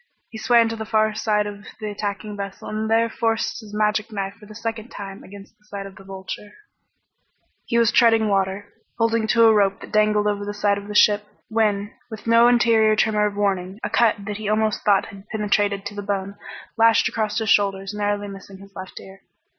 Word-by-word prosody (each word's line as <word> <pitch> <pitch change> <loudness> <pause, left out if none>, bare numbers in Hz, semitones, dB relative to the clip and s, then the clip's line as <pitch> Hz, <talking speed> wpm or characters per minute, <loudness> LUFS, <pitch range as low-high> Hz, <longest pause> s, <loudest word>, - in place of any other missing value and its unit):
He 225 - -8
swam 235 0 +4
to 225 - -4
the 220 - -5
far 215 0 +1
side 210 -1 0
of 205 0 -7 0.2
the 215 -1 -4
attacking 205 0 -4
vessel 200 -1 -7
and 215 +1 -3
there 225 +1 +3
forced 225 0 -1
his 215 -3 -12
magic 210 +1 0
knife 195 -2 -3
for 210 0 -17
the 215 - -12
second 225 +1 -5
time 195 -1 -8
against 200 +2 -13
the 210 - -31
side 200 -1 -7
of 195 -1 -11
the 195 - -14
Vulture. 195 +2 -8 1.1
He 235 - 0
was 235 0 +4
treading 225 -2 +4
water, 195 0 -1 0.2
holding 230 -1 +1
to 230 +1 +4
a 225 -1 +7
rope 195 -2 +2
that - - -11
dangled 210 0 +3
over 205 -1 -1
the 205 0 -5
side 205 -1 +1
of 200 - -11
the 210 - -7
ship 210 0 +4 0.2
when, 210 -2 0 0.2
with 220 -2 -9
no 230 +1 +5
interior 230 -3 +4
tremor 210 -1 +2
of 205 - -5
warning, 195 -1 -1
a - - -3
cut 220 -4 +2
that 210 -1 -4
he 210 -1 -4
almost 215 0 +1
thought 200 -2 +3
had 195 0 -13
penetrated 205 -2 0
to - - -5
the 205 - -5
bone 200 -1 -3 0.4
lashed 225 -1 +5
across 215 -1 -2
his 220 -3 +1
shoulders 195 -1 +1
narrowly 205 0 -1
missing 195 -1 -10
his 195 +1 -15
left 190 0 -8
ear. 190 0 -14
210 Hz, 210 wpm, -22 LUFS, 200-220 Hz, 1.1 s, a